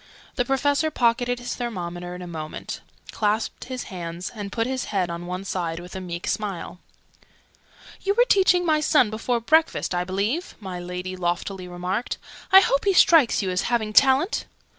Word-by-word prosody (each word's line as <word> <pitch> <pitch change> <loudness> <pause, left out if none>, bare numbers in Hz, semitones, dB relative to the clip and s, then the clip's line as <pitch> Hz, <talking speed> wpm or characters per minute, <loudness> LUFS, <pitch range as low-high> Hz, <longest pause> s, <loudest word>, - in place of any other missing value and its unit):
The 245 - 0
Professor 285 +4 +1
pocketed 245 -2 +1
his 245 0 -4
thermometer 180 -7 -5
in 180 - -8
a - - -6
moment, 155 -3 -6 0.3
clasped 215 +1 -1
his 255 -1 -5
hands, 175 -2 -6
and 205 -3 -6
put 225 -1 0
his 260 0 -2
head 185 -4 -1
on 170 +1 -6
one 180 +2 -4
side 170 -3 -2
with 180 +1 -10
a 190 - -4
meek 175 -1 -5
smile. 195 -4 -3 1.2
"You 400 +1 0
were 485 - +5
teaching 365 -4 +4
my 310 -2 +3
son 295 -7 +3
before 235 +2 -1
breakfast, 315 - +2
I 175 0 0
believe?" 205 - -2
my 190 -4 -6
Lady 180 +1 -5
loftily 180 +1 -3
remarked. 180 +6 -3 0.3
"I 385 0 +10
hope 280 -5 +1
he 395 - +4
strikes 320 - +5
you 185 - -1
as 180 +4 -1
having 220 -3 0
talent?" 275 - +4
210 Hz, 175 wpm, -24 LUFS, 180-260 Hz, 1.2 s, I